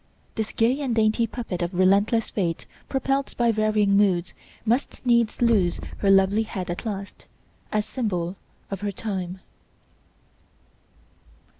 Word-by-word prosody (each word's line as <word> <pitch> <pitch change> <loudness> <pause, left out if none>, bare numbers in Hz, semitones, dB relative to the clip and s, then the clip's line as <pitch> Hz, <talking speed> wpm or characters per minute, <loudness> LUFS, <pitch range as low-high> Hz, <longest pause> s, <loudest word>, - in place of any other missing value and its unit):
This 220 -1 -3
gay 245 +5 +2
and 255 -5 -1
dainty 220 +1 +2
puppet 220 -6 -5
of 175 +1 -2
relentless 200 +5 +3
Fate 170 -5 -2 0.2
propelled 270 0 -1
by 235 -1 +3
varying 215 -2 +2
moods 190 -3 +2 0.3
must 245 +4 -1
needs 235 -1 +2
lose 205 -7 +3 0.2
her 200 - +2
lovely 195 +2 +5
head 190 -5 -4
at 175 +6 -5
last, 200 -2 -6 0.4
as 210 -1 0
symbol 190 -7 -2 0.4
of 195 - -4
her 205 -1 -1
time. 190 -3 -4
210 Hz, 130 wpm, -25 LUFS, 190-230 Hz, 0.4 s, lovely